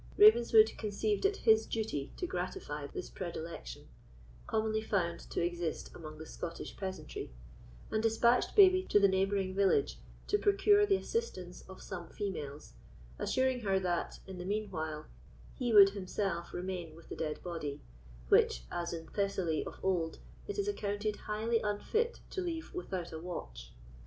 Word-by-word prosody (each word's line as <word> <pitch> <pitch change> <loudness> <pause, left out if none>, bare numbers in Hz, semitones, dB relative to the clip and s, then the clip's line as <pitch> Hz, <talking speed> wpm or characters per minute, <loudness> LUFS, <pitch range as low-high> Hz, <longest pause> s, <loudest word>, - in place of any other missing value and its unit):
Ravenswood 235 - +7
conceived 230 - -1
it 400 0 +3
his 220 -1 +4
duty 210 -11 -2
to 360 - -2
gratify 360 - -4
this 375 -2 -6
predilection, 165 - -6 0.6
commonly 220 0 0
found 175 -6 0
to - - 0
exist 175 -2 -3
among 155 -2 -9
the 160 - -8
Scottish 165 +1 -6
peasantry, 190 -1 -5 0.6
and 215 - +1
despatched 230 +2 +3
Babie 370 -2 +8
to 205 - +6
the 200 - +6
neighbouring 190 0 +1
village 200 - +2 0.3
to 415 - +1
procure 410 +1 +4
the 395 - +4
assistance 185 - -3
of 190 - -10
some 175 -3 -6
females, 150 - -5 0.5
assuring 260 -1 +1
her 195 -4 +1
that, 175 -2 -2
in 190 -1 -8
the 180 - -5
mean 205 +1 -2
while, 155 -3 -4 0.5
he 245 -3 -1
would 200 -2 +9
himself 195 -2 -3
remain 175 -3 -4
with 165 - -15
the - - -5
dead 155 -1 -3
body, 150 -5 -4 0.5
which, - - +4
as 170 0 -2
in 165 -1 -5
Thessaly 190 -2 -1
of - - -8
old, 175 -4 0 0.3
it 410 - -4
is 405 0 0
accounted 210 - -1
highly 220 +3 -1
unfit 430 - -1
to 380 - -2
leave 335 -1 -4
without 185 - -4
a 160 - -5
watch. - - -7
195 Hz, 155 wpm, -33 LUFS, 170-230 Hz, 0.6 s, would